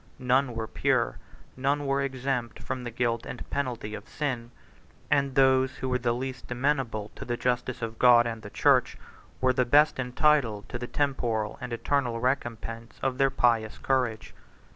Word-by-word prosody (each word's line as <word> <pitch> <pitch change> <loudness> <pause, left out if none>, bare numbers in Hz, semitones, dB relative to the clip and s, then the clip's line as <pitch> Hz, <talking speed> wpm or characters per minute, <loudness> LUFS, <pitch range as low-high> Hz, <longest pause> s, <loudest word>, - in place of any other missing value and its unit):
None 125 -1 +1
were 110 -1 -2
pure; - - 0 0.4
none 140 +2 0
were 140 0 +1
exempt 130 -3 -2
from 130 -1 -4
the 120 - -4
guilt 115 0 -1
and 125 - -7
penalty 125 -6 -3
of 105 -1 -8
sin; 130 -6 -3 0.6
and 140 -2 +2
those 130 -1 +4
who 130 - -4
were 125 0 +1
the 120 -1 +1
least 130 +1 -5
amenable 125 -5 -1
to - - -8
the 120 0 -3
justice 125 0 -1
of 115 0 -5
God 120 -1 +7
and 115 -1 -4
the 105 - -9
church - - +3 0.4
were 130 0 +3
the 125 - +2
best 145 +4 +4
entitled 125 -4 +2
to 120 - -4
the 120 - -5
temporal 120 -7 -1
and 125 - -5
eternal 120 0 0
recompense 115 -2 -3
of 130 -1 -1
their 135 0 +4
pious 115 -4 +1
courage. 125 -5 -1
125 Hz, 170 wpm, -27 LUFS, 115-135 Hz, 0.6 s, God